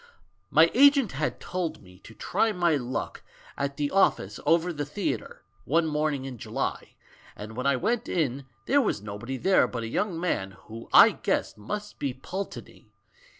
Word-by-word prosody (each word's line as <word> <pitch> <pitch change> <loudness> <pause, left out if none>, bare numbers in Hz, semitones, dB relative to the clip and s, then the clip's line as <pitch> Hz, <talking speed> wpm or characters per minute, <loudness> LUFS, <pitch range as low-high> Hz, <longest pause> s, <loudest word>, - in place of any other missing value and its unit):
"]\Iy 160 +2 +6
agent 275 -4 +5
had 150 +3 -2
told 180 - -4
me 90 -1 -17
to 110 - -14
try 225 - 0
my 175 -5 +2
luck 125 -2 -4 0.3
at 140 0 -3
the 145 -1 -1
office 110 - +2
over 170 +1 +3
the 145 -2 -3
theatre, 145 - -4 0.2
one 165 +3 +2
morning 150 -3 -1
in 130 -3 -7
July, - - -4 0.4
and 110 +2 -9
when 125 +3 -2
I 140 - +3
went 235 - -1
in, 140 -5 -1 0.2
there 285 +1 +4
was 105 - -1
nobody 105 +6 -5
there 185 -2 +3
but 120 -1 -5
a - - -3
young 175 - -1
man 95 - -2
who 115 +1 -10
I - - +9
guessed - - -2
must 210 - -6
be 135 -3 -2
Pulteney. 190 +9 -7
145 Hz, 170 wpm, -27 LUFS, 120-180 Hz, 0.4 s, I